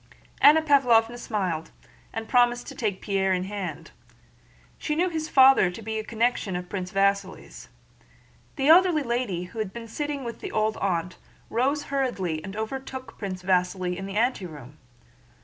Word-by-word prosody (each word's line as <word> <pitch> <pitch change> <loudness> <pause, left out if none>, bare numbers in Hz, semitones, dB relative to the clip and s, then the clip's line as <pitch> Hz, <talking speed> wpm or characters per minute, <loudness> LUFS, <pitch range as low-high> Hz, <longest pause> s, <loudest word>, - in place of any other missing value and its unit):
Anna 315 +2 +7
Pávlovna 240 -6 +4
smiled 185 -9 -3 0.4
and 225 0 -5
promised 245 0 +3
to - - -8
take 205 -5 -3
Pierre 195 -1 +1
in 180 0 -1
hand. 180 -5 -6 0.9
She 300 - -2
knew 355 +3 +1
his 315 -2 -4
father 265 -7 +6
to 180 +5 -9
be 220 +1 -3
a - - -4
connection 230 -3 -1
of 180 0 -5
Prince 185 -2 -4
Vasíli's. 200 0 -1 0.9
The 275 -2 0
elderly 335 -1 +6
lady 235 -8 -2
who 185 +5 -9
had 215 -3 -2
been 230 +2 -8
sitting 290 +4 -4
with 235 -1 -6
the - - -6
old 215 0 0
aunt 180 -2 -2 0.3
rose 275 +5 +1
hurriedly 190 - -1
and 195 +1 -7
overtook 260 +4 -6
Prince 185 -3 -5
Vasíli 180 0 0
in 195 +1 -6
the 195 +1 -5
anteroom. 165 - -2
220 Hz, 160 wpm, -26 LUFS, 185-260 Hz, 0.9 s, Anna